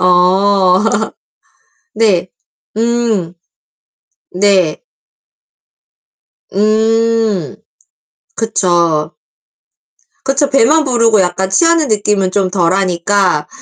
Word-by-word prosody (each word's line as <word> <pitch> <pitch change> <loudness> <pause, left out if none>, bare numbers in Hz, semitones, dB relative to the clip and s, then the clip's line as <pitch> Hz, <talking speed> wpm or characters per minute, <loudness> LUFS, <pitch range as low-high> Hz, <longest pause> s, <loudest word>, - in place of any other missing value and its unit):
어. 185 +1 +2 1.1
네. 190 -5 +1 0.5
음. 225 -6 -1 1.0
네. 185 -4 +1 1.7
음 220 -2 0 0.8
그쵸. 170 -7 -1 1.1
그쵸. 275 +1 0
배만 285 +4 +3
부르고 230 -6 +2
약간 185 +1 -2
취하는 330 - +2
느낌은 205 -3 0
좀 195 -2 0
덜하니까 180 -2 0
200 Hz, 120 characters per minute, -13 LUFS, 180-225 Hz, 1.7 s, 배만